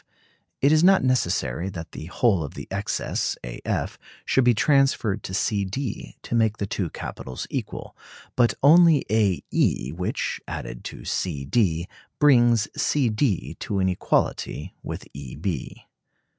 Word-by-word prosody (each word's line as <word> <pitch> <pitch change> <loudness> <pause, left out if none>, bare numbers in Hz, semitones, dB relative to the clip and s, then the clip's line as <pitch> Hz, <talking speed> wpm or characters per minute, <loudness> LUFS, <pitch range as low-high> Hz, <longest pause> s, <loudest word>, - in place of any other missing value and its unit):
It 140 - +5
is 155 +1 +4
not 190 +1 +6
necessary 95 - 0
that 85 -4 -8
the 80 - -8
whole 95 -2 +2
of 75 - -7
the - - -7
excess, - - -2
A - - -7
F - - -2 0.3
should 130 - +3
be 120 -1 +4
transferred 135 -6 +2
to 95 - -7
C 100 +1 +1
D 115 +5 -5
to - - -6
make 110 -2 +2
the 100 - -2
two 100 -4 -2
capitals 65 -3 -6
equal, - - -5 0.4
but 120 -2 +3
only 160 0 +6
A 105 -5 +2
E, 65 - +1
which, 90 +4 -3
added - - -6
to - - -8
C 75 -7 -2
D, 85 - +1 0.3
brings 120 -6 +5
C 145 -4 +1
D 95 - 0
to 100 - -3
an 95 -1 +2
equality 90 -4 -1
with - - -7
E 70 -3 -8
B. - - -4
105 Hz, 155 wpm, -24 LUFS, 85-130 Hz, 0.4 s, not